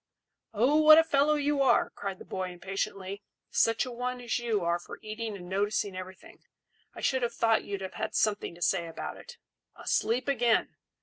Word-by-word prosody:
"Oh, 245 +8 +3
what 310 0 +9
a 325 - +7
fellow 300 -1 +3
you 290 -1 +1
are!" 270 - +3
cried 195 -2 -5
the - - -12
boy 185 -1 -4
impatiently. 195 +2 -4 0.3
"Such 225 +3 +2
a 255 - -6
one 250 +1 -3
as 240 0 -2
you 225 -5 -1
are 170 +1 +1
for - - -10
eating 215 0 -5
and 175 -2 -10
noticing 200 +1 -1
everything, 185 0 -10 0.6
I - - -8
should 260 -1 +1
have 235 -1 -2
thought 225 -1 +2
you'd 200 -1 -4
have 190 - -6
had 220 - -4
something 205 -5 0
to 175 - -5
say 170 -1 +1
about 165 - -6
it. 485 - -12 0.4
Asleep 245 +4 0
again! 240 -4 +2
220 Hz, 190 wpm, -29 LUFS, 190-250 Hz, 0.6 s, what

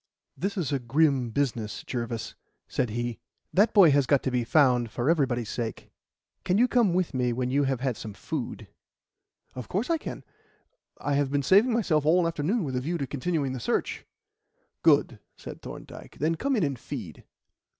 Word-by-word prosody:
"This 200 +2 -3
is 160 -8 -1
a 140 - +1
grim 135 0 +2
business, 115 -4 -2
Jervis," 120 -2 -4 0.3
said 125 - -1
he. 120 +1 -3 0.3
"That 210 +4 +4
boy 190 -7 +7
has 140 -2 +3
got 140 -3 +3
to 130 - -1
be 125 -1 +1
found 125 -3 +3
for 125 +7 +1
everybody's 125 -8 0
sake. 115 -3 -5 0.5
Can 185 +1 +1
you 245 +3 +5
come 230 -8 +2
with 185 -4 0
me 125 -2 +1
when 125 +1 -2
you 140 +1 +2
have 135 -2 -1
had 130 -3 0
some 105 -2 -8
food?" - - -5 0.9
"Of 125 -2 -7
course 220 - -1
I 330 - +2
can. - - -7 0.7
I 145 - -2
have 140 -1 +1
been 140 0 0
saving 200 - +5
myself 180 -10 +1
all 170 +4 +4
the 165 - +2
afternoon 170 +8 -1
with 135 -4 -3
a 125 - 0
view 170 +6 -2
to 140 - -2
continuing 140 0 -2
the 130 - -4
search." - - -2 0.7
"Good," - - +3 0.2
said - - -9
Thorndyke. - - -10
"Then 155 +4 +1
come 270 - 0
in 210 - +1
and 140 -5 -1
feed." - - -7
140 Hz, 190 wpm, -27 LUFS, 125-175 Hz, 0.9 s, boy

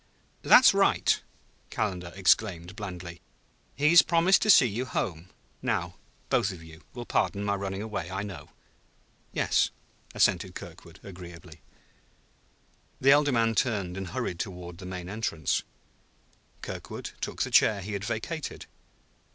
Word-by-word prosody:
"That's - - +7
right!" - - +2 0.5
Calendar 90 -5 -3
exclaimed 95 -2 +1
blandly. 90 -5 -7 0.5
"He's 160 +4 +7
promised 170 +3 +3
to 215 - 0
see 160 - +8
you 120 +3 -2
home. 90 -7 -3 0.3
Now - - -2 0.4
both 95 - +2
of 85 -3 -10
you 80 0 -14
will 120 -1 -6
pardon 100 -3 0
my 100 0 0
running 100 0 -4
away, 100 -6 -4
I 95 +2 -3
know." 95 -8 -8 0.8
"Yes," - - +2 0.5
assented - - +2
Kirkwood - - -11
agreeably. 85 -3 -11 1.4
The 135 - +5
elder 145 0 +5
man 115 -2 +2
turned 105 -7 -1
and 95 -1 -5
hurried 115 -6 -4
toward 90 -3 -6
the 90 - -8
main 90 -1 -6
entrance. 95 - -1 1.0
Kirkwood - - -7
took - - -2
the - - -5
chair 105 -2 +4
he 105 +3 -6
had 100 0 -4
vacated. 140 +10 -4
100 Hz, 135 wpm, -28 LUFS, 90-115 Hz, 1.4 s, see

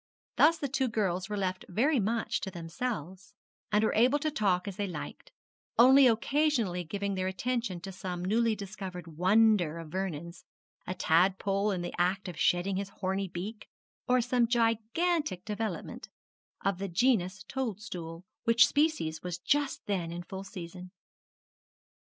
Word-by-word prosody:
Thus 325 +2 +5
the 290 - -2
two 265 0 0
girls 190 -4 -1
were 210 - -2
left 185 -1 -2
very 255 - +2
much 225 +2 -1
to 195 - -3
themselves, 185 - -5 0.4
and 210 0 +3
were 220 - +2
able 250 +6 +4
to 310 +1 -1
talk 195 -8 +1
as 200 - -4
they 205 - -1
liked, 165 -5 -7 0.5
only 260 +3 +8
occasionally 230 - +1
giving 200 +4 -3
their 185 -1 -1
attention 230 -1 -2
to 195 +1 -6
some 180 -1 -5
newly 225 +3 +2
discovered 190 -4 -7
wonder 180 0 +3
of 165 -2 -8
Vernon's, 170 -2 -4 0.4
a 185 - -3
tadpole 195 +5 +2
in 185 -3 -1
the 175 - -5
act 190 +3 0
of 180 - -6
shedding 185 +2 +2
his 200 0 -3
horny 195 0 -2
beak, 200 +5 -6 0.4
or 250 0 +4
some 245 0 +2
gigantic 230 - 0
development 215 +1 -4 0.6
of 195 -2 +1
the 195 - -2
genus 190 -1 +1
toadstool, 195 -8 -5 0.2
which 230 0 +6
species 285 - 0
was 180 -1 -4
just 290 +9 0
then 180 -5 -2
in 175 +1 -5
full 190 +2 -7
season. 180 -1 -9
195 Hz, 150 wpm, -30 LUFS, 180-230 Hz, 0.6 s, only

